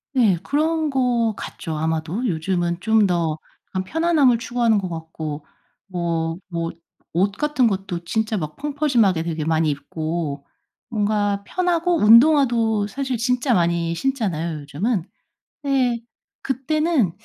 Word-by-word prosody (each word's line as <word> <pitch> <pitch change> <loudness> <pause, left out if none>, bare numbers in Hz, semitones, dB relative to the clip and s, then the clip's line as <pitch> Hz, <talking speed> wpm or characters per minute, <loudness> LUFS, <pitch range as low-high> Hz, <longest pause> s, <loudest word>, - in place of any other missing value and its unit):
네 225 -9 +4
그런 315 +2 +1
것 245 -4 +1
같죠, 160 -2 -6
아마도. 160 +9 -1
요즘은 175 0 -1
좀 220 -1 +4
더 165 -4 0 0.3
약간 185 -1 -2
편안함을 310 - +3
추구하는 235 -2 +2
것 190 -2 -2
같고 160 -2 -6 0.4
뭐, 170 -3 -2
뭐 170 -2 -2 0.4
옷 195 +4 +2
같은 295 -3 +2
것도 190 -4 -3
진짜 220 +4 -1
막 155 -4 -4
펑퍼짐하게 270 - +1
되게 165 -2 -3
많이 160 0 +1
입고 150 0 -3 0.4
뭔가 205 -2 0
편하고 355 - +1
운동화도 230 -3 +5
사실 265 +2 -3
진짜 250 +2 +1
많이 170 -2 +1
신잖아요, 170 - -1
요즘은. 170 - -1 0.6
네. 260 -4 +1 0.4
그때는 275 - +1
205 Hz, 260 characters per minute, -22 LUFS, 165-255 Hz, 0.6 s, 운동화도